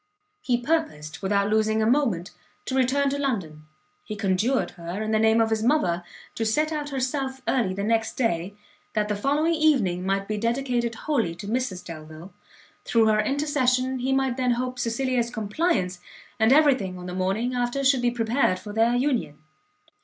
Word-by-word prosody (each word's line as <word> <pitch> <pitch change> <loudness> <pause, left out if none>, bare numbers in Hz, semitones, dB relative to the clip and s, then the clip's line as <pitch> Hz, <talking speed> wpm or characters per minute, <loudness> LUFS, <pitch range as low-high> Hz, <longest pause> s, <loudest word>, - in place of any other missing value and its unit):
He 250 -10 +1
purposed, 240 - -2
without 200 +1 +1
losing 220 0 +2
a 215 - +2
moment, 225 -8 +1 0.3
to - - -4
return 270 +2 +2
to 280 - -2
London; 180 - -3 0.4
he 215 - -6
conjured 205 +6 0
her, 175 +1 -6
in 215 0 -2
the 220 - +2
name 220 +1 +4
of 225 0 +2
his 220 -1 +1
mother, 185 - +1 0.3
to 225 - -3
set 300 +8 +1
out 295 -2 -3
herself 265 0 -3
early 230 -7 +1
the 200 - -3
next 225 +1 +1
day, 195 -5 -1 0.4
that 210 -1 0
the 210 - 0
following 290 +9 +1
evening 260 - +2
might 195 +1 -1
be 215 -1 -2
dedicated 235 0 -1
wholly 230 - -1
to 195 +4 -9
Mrs 220 -5 -2
Delvile: 160 +2 -10 0.5
through 230 -1 +3
her 215 0 +3
intercession 260 -1 0
he 260 +2 -1
might 265 -2 +1
then 250 -2 +2
hope 250 +1 -3
Cecilia's 240 0 0
compliance, 210 - -1 0.4
and 220 +2 +4
every 290 0 +6
thing 190 -7 -5
on 180 - -8
the 180 - -5
morning 195 +7 -1
after 245 +2 -1
should 265 -2 +4
be 245 - +3
prepared 235 -3 +1
for 205 +3 -9
their 225 +2 +3
union. 245 - 0
230 Hz, 180 wpm, -25 LUFS, 200-265 Hz, 0.5 s, every